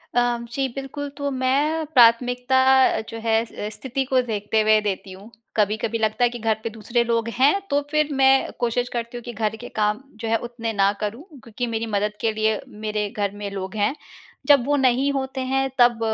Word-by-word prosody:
अ, 245 - +5 0.3
जी, 270 +1 0
बिल्कुल। 280 +1 -5
तो 285 -1 -2
मैं 280 +5 +1
प्राथमिकता 245 +2 +5 0.5
जो 225 - -6
है, 225 -1 +3
स 210 -2 -6
स्थिति 265 +2 -3
को 260 -1 +4
देखते 210 +1 0
हुए 215 0 +4
देती 195 -1 -3
हूँ। 210 +4 -14 0.3
कभी-कभी 215 +2 +1
लगता 220 +2 0
है 240 - +5
कि 240 0 -7
घर 220 -1 +1
पे 230 - -2
दूसरे 225 +2 -1
लोग 230 -1 0
हैं, 290 +9 +5
तो 285 0 +2
फिर 305 -1 +2
मैं 265 0 +4
कोशिश 245 +1 0
करती 235 +1 -5
हूँ 240 - -9
कि 240 - -7
घर 220 0 -1
के - - -7
काम 210 +4 0 0.2
जो 225 - -3
है, 225 - +3
उतने 230 -2 -4
ना 200 -1 +3
करूँ 220 +7 -4 0.2
क्योंकि 235 +2 -4
मेरी 230 0 -2
मदद 210 +1 -1
के 225 - +1
लिए 215 0 +1
मेरे 210 -1 -3
घर 205 -3 -2
में 200 - -3
लोग 190 0 -6
हैं। 210 +6 +1 0.5
जब 285 -4 +6
वो 290 +1 +2
नहीं 265 0 +2
होते 265 -1 -3
हैं, 270 +1 +1
तब 240 -1 +5
235 Hz, 205 wpm, -23 LUFS, 215-265 Hz, 0.5 s, जब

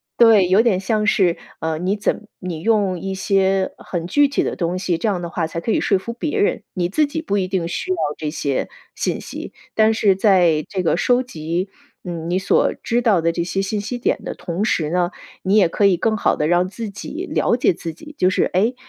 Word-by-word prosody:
对， 220 -6 +6
有 190 +4 +5
点 225 -6 +2
像 210 +2 0
是 185 -6 +3 0.2
呃， 160 -1 -2
你 190 +4 0
怎 215 +1 -2
你 175 -4 -5
用 200 -4 +1
一 195 +1 -4
些 190 0 +1
很 170 -2 -4
具 290 +10 +3
体 275 - 0
的 - - -2
东 175 0 -1
西， 185 -2 -1
这 220 - -2
样 185 -3 -1
的 170 - -4
话 165 -1 -2
才 165 - -5
可 225 - -2
以 - - +1
说 195 - +2
服 235 +5 -6
别 300 - -3
人。 410 +2 +1
你 175 -2 0
自 295 +10 +1
己 305 +3 -4
不 205 -10 -2
一 185 -1 0
定 185 -3 -1
需 175 - -4
要 185 - 0 0.2
这 155 - -4
些 140 -3 -2 0.3
信 - - -1
息， - - -8 0.2
但 220 0 +4
是 205 -3 +3
在 180 -6 +3
这 185 -2 -2
个 165 - +2
收 245 +6 +2
集 170 -2 -3 0.4
嗯， 170 -2 -5
你 180 - +1
所 190 - +2
知 235 +1 +1
道 205 -8 +3
的 165 0 +2
这 170 0 -2
些 195 +3 -2
信 205 +1 -2
息 245 +4 -4
点 240 - -1
的 - - -5
同 175 +2 -3
时 160 -8 0
呢， 175 0 +1 0.3
你 195 +3 +1
也 195 -5 +6
可 200 +4 +1
以 180 -3 +3
更 220 -1 +1
好 210 - +1
地 150 - 0
让 175 +2 +2
自 220 0 -6
己 305 - -6
了 - - +2
解 210 - +3
自 165 -1 -6
己。 300 - -13
就 185 - +3
是 185 - +1
哎， 215 +8 +1
190 Hz, 255 characters per minute, -20 LUFS, 175-215 Hz, 0.4 s, 对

